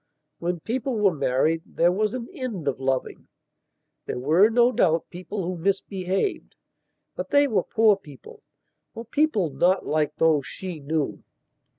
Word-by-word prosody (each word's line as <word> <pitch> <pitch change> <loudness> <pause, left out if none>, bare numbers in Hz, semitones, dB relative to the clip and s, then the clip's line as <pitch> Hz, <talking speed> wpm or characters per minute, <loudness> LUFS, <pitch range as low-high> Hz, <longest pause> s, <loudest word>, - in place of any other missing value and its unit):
When 175 -1 -2
people 250 - -2
were 200 -3 +3
married 145 +3 +1
there 170 +1 +1
was 210 +4 0
an 240 -2 -5
end 240 - -5
of 135 -2 -1
loving. 130 -1 -2 0.8
There - - -3
were, 160 - +4
no 240 +2 +4
doubt, 165 -8 +1
people 185 +3 -5
who 175 -1 -4
misbehavedbut 195 - -4
they 285 0 +4
were 220 -6 +1
poor 220 -2 +3
peopleor 145 -9 -14 0.7
people 255 - +1
not 175 +8 +2
like 150 -1 0
those 155 -4 +2
she 180 -4 -6
knew. 150 0 -2
180 Hz, 135 wpm, -25 LUFS, 155-215 Hz, 0.8 s, were